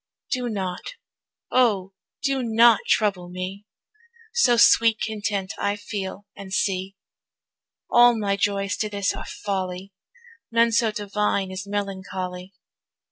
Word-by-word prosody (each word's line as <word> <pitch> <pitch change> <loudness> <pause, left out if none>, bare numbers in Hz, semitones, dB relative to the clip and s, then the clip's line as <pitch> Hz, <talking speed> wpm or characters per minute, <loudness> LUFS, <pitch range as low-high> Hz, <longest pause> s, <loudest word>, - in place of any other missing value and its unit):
Do 250 -2 -1
not, 190 - -4 0.6
O 205 -7 +2 0.3
do 275 -1 +1
not 230 -1 +5
trouble 195 -4 +1
me, 185 +3 -6 0.7
So 250 - +4
sweet 230 -1 +5
content 205 -3 -2
I 200 0 0
feel 200 -1 -6
and 195 -1 -10
see. 195 -2 -1 0.9
All 240 -1 +6
my 200 -2 0
joys 200 0 0
to 215 - -1
this 200 -2 -1
are - - -7
folly, 190 -1 -4 0.6
None 230 0 +4
so 225 0 +2
divine 205 -2 -1
as 190 +1 -6
melancholy. 190 -2 -5
200 Hz, 120 wpm, -24 LUFS, 190-225 Hz, 0.9 s, All